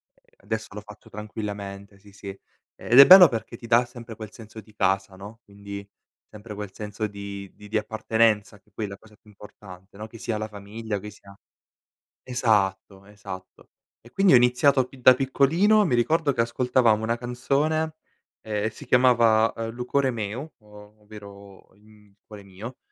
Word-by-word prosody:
ehm, -, -, -34 dB
adesso 110 Hz, 0 st, -5 dB
l'ho 105 Hz, +1 st, -8 dB
fatto 105 Hz, 0 st, -15 dB
tranquillamente, 100 Hz, -2 st, -7 dB
sì, 100 Hz, 0 st, -18 dB
sì. 100 Hz, 0 st, -13 dB, 0.5 s
Ed 120 Hz, -, 0 dB
è 140 Hz, -, +12 dB
bello 185 Hz, 0 st, +10 dB
perché 115 Hz, -2 st, -5 dB
ti 115 Hz, -, -11 dB
dà 120 Hz, +1 st, +4 dB
sempre 120 Hz, -2 st, -11 dB
quel 110 Hz, -1 st, -9 dB
senso 110 Hz, -1 st, -12 dB
di 110 Hz, 0 st, -22 dB
casa, 95 Hz, -1 st, -1 dB
no, 105 Hz, +5 st, -12 dB
quindi 100 Hz, 0 st, -10 dB, 0.4 s
sempre 105 Hz, 0 st, -11 dB
quel 105 Hz, -2 st, -7 dB
senso 105 Hz, 0 st, -5 dB
di 100 Hz, -1 st, -9 dB
di 105 Hz, -, -14 dB
di 110 Hz, -, -1 dB
appartenenza 110 Hz, -1 st, 0 dB
che 105 Hz, -, -34 dB
poi 105 Hz, +2 st, -5 dB
è -, -, -5 dB
la 100 Hz, 0 st, -9 dB
cosa 110 Hz, +1 st, -20 dB
più 105 Hz, -, -24 dB
importante, 100 Hz, -2 st, -15 dB
no, 110 Hz, +1 st, -7 dB
che 115 Hz, -, -13 dB
sia 110 Hz, -1 st, -3 dB
la 110 Hz, -, -4 dB
famiglia 105 Hz, +1 st, -7 dB
o -, -, -3 dB
che 105 Hz, +2 st, -9 dB
sia 100 Hz, -1 st, -17 dB, 0.9 s
esatto, 100 Hz, -5 st, -1 dB
esatto. 100 Hz, -3 st, -11 dB, 0.3 s
E 120 Hz, -, -17 dB
quindi 195 Hz, +5 st, +3 dB
ho 125 Hz, -, +9 dB
iniziato 125 Hz, +2 st, +3 dB
pi 135 Hz, -, -17 dB
da 130 Hz, -, +8 dB
piccolino, 160 Hz, +11 st, +2 dB
mi 135 Hz, -, -1 dB
ricordo 150 Hz, +5 st, +1 dB
che 115 Hz, -, 0 dB
ascoltavamo 115 Hz, -2 st, +1 dB
una 115 Hz, +1 st, -1 dB
canzone 145 Hz, +6 st, -1 dB, 0.4 s
e 105 Hz, 0 st, -2 dB
si -, -, -13 dB
chiamava 115 Hz, -3 st, +3 dB, 0.2 s
"Lu 120 Hz, +1 st, -7 dB
core 135 Hz, +1 st, +1 dB
meu", 115 Hz, +5 st, -5 dB
o 105 Hz, 0 st, -17 dB
ovvero 100 Hz, -2 st, -14 dB
il, 105 Hz, -, -27 dB
mhmm, 105 Hz, -1 st, -22 dB
cuore 105 Hz, -2 st, -12 dB
mio, 100 Hz, +6 st, -10 dB
110 Hz, 180 wpm, -24 LUFS, 100-120 Hz, 0.9 s, è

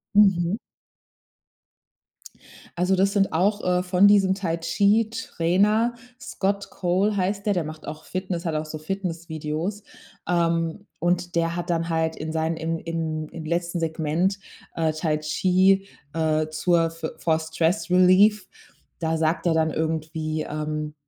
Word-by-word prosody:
Mhm. 190 Hz, -2 st, +4 dB, 2.2 s
Also, 185 Hz, +2 st, +3 dB
das 195 Hz, +1 st, +2 dB
sind 195 Hz, -4 st, +1 dB
auch, 205 Hz, +5 st, +1 dB
äh, 180 Hz, 0 st, +2 dB
von 185 Hz, +2 st, +4 dB
diesem 195 Hz, -2 st, +4 dB
Tai-Chi-Trainer 205 Hz, +3 st, +1 dB, 0.3 s
Scott 200 Hz, -5 st, -2 dB
Cole 195 Hz, +3 st, 0 dB
heißt 195 Hz, +2 st, -1 dB
der. 205 Hz, -, +3 dB
Der 175 Hz, -, 0 dB
macht 155 Hz, 0 st, -9 dB
auch 155 Hz, -, -7 dB
Fitness, 185 Hz, -2 st, -4 dB
hat 165 Hz, -, -1 dB
auch 155 Hz, 0 st, -2 dB
so 155 Hz, -, -6 dB
Fitnessvideos. 165 Hz, +1 st, -4 dB, 0.5 s
Ähm, 170 Hz, +2 st, 0 dB
und 175 Hz, 0 st, 0 dB
der 170 Hz, 0 st, +1 dB
hat 175 Hz, 0 st, -3 dB
dann 165 Hz, 0 st, -1 dB
halt 160 Hz, 0 st, 0 dB
in 155 Hz, +1 st, -5 dB
seinen 160 Hz, +1 st, -1 dB
im 165 Hz, 0 st, -2 dB
in 160 Hz, -2 st, -3 dB
im 165 Hz, -2 st, -8 dB
letzten 170 Hz, +2 st, -1 dB
Segment, 165 Hz, +4 st, 0 dB, 0.4 s
äh, 160 Hz, -2 st, +1 dB
Tai 155 Hz, -1 st, 0 dB
Chi, 185 Hz, +5 st, +2 dB, 0.3 s
äh, 155 Hz, -1 st, +1 dB
zur 165 Hz, +1 st, +1 dB
fo 165 Hz, -1 st, -5 dB
for 160 Hz, -1 st, +1 dB
Stress 160 Hz, +4 st, -1 dB
Relief, 185 Hz, +3 st, +5 dB, 0.5 s
da 160 Hz, -1 st, 0 dB
sagt 160 Hz, +2 st, 0 dB
er 165 Hz, -, +3 dB
dann 160 Hz, -1 st, +2 dB
irgendwie, 155 Hz, 0 st, -2 dB
ähm 150 Hz, 0 st, -4 dB
170 Hz, 140 wpm, -24 LUFS, 160-190 Hz, 2.2 s, Relief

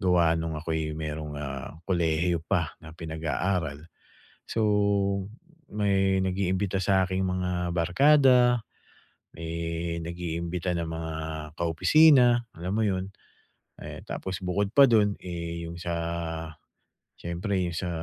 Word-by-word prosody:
gawa 85 Hz, -3 st, +3 dB
no'ng 80 Hz, -1 st, -3 dB
ako'y 80 Hz, -1 st, -2 dB
mayro'ng, 75 Hz, -1 st, -5 dB
ah, 70 Hz, +1 st, -6 dB
kolehiyo 85 Hz, -1 st, +1 dB
pa -, -, -1 dB
na 80 Hz, -, -10 dB
pinag-aaral. 80 Hz, -1 st, -2 dB, 0.7 s
So, 115 Hz, -, -1 dB, 1.1 s
may 95 Hz, -2 st, +2 dB
nag-iimbita 95 Hz, +1 st, 0 dB
sa 95 Hz, -1 st, +3 dB
aking 95 Hz, +1 st, -1 dB
mga 90 Hz, -1 st, -1 dB
barkada, 125 Hz, -, +5 dB, 0.7 s
may 85 Hz, 0 st, -3 dB
nag-iimbita 85 Hz, +1 st, -3 dB
ng 85 Hz, -1 st, -2 dB
mga 80 Hz, 0 st, -4 dB, 0.5 s
kaopisina, 120 Hz, -, +5 dB
alam 90 Hz, +3 st, -4 dB
mo 110 Hz, -, +2 dB
'yon, 95 Hz, -1 st, -1 dB, 0.7 s
eh, -, -, -7 dB
tapos 95 Hz, -1 st, -4 dB
bukod 100 Hz, +2 st, 0 dB
pa 140 Hz, 0 st, +8 dB
do'n, 105 Hz, -3 st, +3 dB
eh, 85 Hz, -1 st, -5 dB
'yong 85 Hz, -, -7 dB
sa 85 Hz, 0 st, -4 dB, 1.3 s
siyempre 90 Hz, +4 st, -2 dB
'yong 85 Hz, -1 st, -2 dB
sa 90 Hz, -, -2 dB
90 Hz, 115 wpm, -27 LUFS, 80-95 Hz, 1.3 s, pa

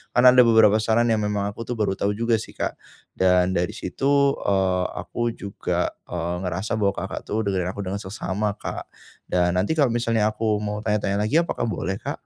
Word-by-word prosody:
Karena 125 Hz, +1 st, +8 dB
ada 125 Hz, 0 st, +7 dB
beberapa 110 Hz, -2 st, +6 dB
saran 115 Hz, +2 st, +2 dB
yang 110 Hz, -, +2 dB
memang 105 Hz, -1 st, -1 dB
aku 115 Hz, +3 st, -8 dB
tuh 125 Hz, -, -2 dB
baru 105 Hz, -3 st, 0 dB
tahu 100 Hz, +1 st, 0 dB
juga 115 Hz, +1 st, +1 dB
sih -, -, -9 dB
Kak, -, -, -3 dB, 0.4 s
dan 90 Hz, 0 st, +3 dB
dari 90 Hz, +4 st, -1 dB
situ, 140 Hz, +2 st, +1 dB
eee, 95 Hz, -2 st, +1 dB
aku 120 Hz, -1 st, -3 dB
juga, 100 Hz, 0 st, -2 dB, 0.2 s
eee, 85 Hz, 0 st, -3 dB
ngerasa 95 Hz, +5 st, -2 dB
bahwa 100 Hz, -2 st, +2 dB
Kakak 95 Hz, +2 st, -4 dB
tuh 110 Hz, +2 st, -1 dB
dengerin 95 Hz, -3 st, -1 dB
aku 100 Hz, -, -4 dB
dengan 95 Hz, +2 st, -3 dB
seksama 100 Hz, +1 st, -3 dB
Kak, -, -, -6 dB, 0.4 s
dan 90 Hz, 0 st, +1 dB
nanti 95 Hz, +11 st, +1 dB
kalau 145 Hz, -5 st, +3 dB
misalnya 115 Hz, -2 st, +1 dB
aku 110 Hz, -1 st, -1 dB
mau 105 Hz, 0 st, -3 dB
tanya-tanya 105 Hz, -1 st, 0 dB
lagi, 120 Hz, -, -1 dB
apakah 145 Hz, -, -2 dB
boleh, 95 Hz, -3 st, -2 dB
Kak? -, -, -6 dB
105 Hz, 195 wpm, -23 LUFS, 95-115 Hz, 0.4 s, Karena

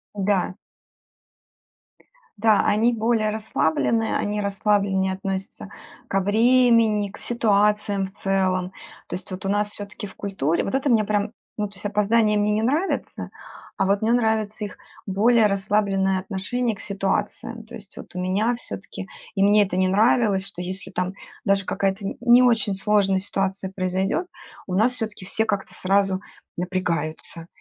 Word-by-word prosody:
Да. 195 Hz, -2 st, 0 dB, 1.8 s
Да, 215 Hz, 0 st, +4 dB
они 225 Hz, +3 st, +3 dB
более 225 Hz, -1 st, +1 dB
расслаблены, 220 Hz, +1 st, 0 dB
они 210 Hz, 0 st, -1 dB
расслабленнее 200 Hz, -1 st, +1 dB
относятся 195 Hz, +1 st, -5 dB, 0.4 s
ко 195 Hz, -, +2 dB
времени, 225 Hz, 0 st, +4 dB
к 215 Hz, -, -12 dB
ситуациям 210 Hz, -3 st, +1 dB
в 190 Hz, -, -14 dB
целом. 190 Hz, -2 st, 0 dB, 0.4 s
То -, -, -4 dB
есть 185 Hz, -, -8 dB
вот 185 Hz, +1 st, -6 dB
у 195 Hz, -, 0 dB
нас 205 Hz, +1 st, +1 dB
всё-таки 205 Hz, 0 st, -7 dB
в 190 Hz, -, -15 dB
культуре 170 Hz, -6 st, -1 dB
вот 195 Hz, -, -2 dB
это 275 Hz, +1 st, 0 dB
мне 220 Hz, -3 st, +4 dB
прям, 205 Hz, 0 st, 0 dB, 0.3 s
ну 210 Hz, -1 st, -1 dB
то 200 Hz, -, -17 dB
есть 190 Hz, -, -12 dB
опоздания 210 Hz, +1 st, +2 dB
мне 205 Hz, 0 st, +2 dB
не 215 Hz, +1 st, +1 dB
нравятся, 300 Hz, +11 st, -1 dB, 0.5 s
а 195 Hz, -, +2 dB
вот 200 Hz, +1 st, +1 dB
мне 220 Hz, +1 st, +2 dB
нравится 220 Hz, -2 st, 0 dB
их 200 Hz, -, -9 dB, 0.3 s
более 215 Hz, +3 st, +4 dB
расслабленное 195 Hz, -1 st, +1 dB
отношение 210 Hz, +5 st, -2 dB
к -, -, -15 dB
ситуациям. 200 Hz, +3 st, -2 dB
То 220 Hz, -, -10 dB
есть 200 Hz, -2 st, -9 dB
вот -, -, -10 dB
у -, -, -3 dB
меня 195 Hz, +6 st, +1 dB
всё-таки -, -, -8 dB, 0.3 s
и 195 Hz, -, +2 dB
мне 205 Hz, +1 st, +6 dB
это 185 Hz, -2 st, -3 dB
не 185 Hz, 0 st, +3 dB
нравилось, 205 Hz, -1 st, +3 dB
что 180 Hz, -2 st, -8 dB
если 185 Hz, +1 st, -3 dB
там 180 Hz, +1 st, -2 dB, 0.3 s
даже 195 Hz, -1 st, +3 dB
какая-то 195 Hz, +1 st, -1 dB
н -, -, -4 dB
не 245 Hz, +1 st, +6 dB
очень 225 Hz, -5 st, +2 dB
сложная 195 Hz, -1 st, +2 dB
ситуация 195 Hz, 0 st, -2 dB
произойдет, 190 Hz, -, -1 dB, 0.4 s
у 185 Hz, -, -4 dB
нас 225 Hz, +6 st, +4 dB
всё-таки 215 Hz, -5 st, -4 dB
все 220 Hz, +4 st, +2 dB
как-то 200 Hz, -3 st, -2 dB
сразу 195 Hz, 0 st, +1 dB, 0.4 s
напрягаются. 170 Hz, -2 st, -3 dB
200 Hz, 155 wpm, -23 LUFS, 190-220 Hz, 1.8 s, мне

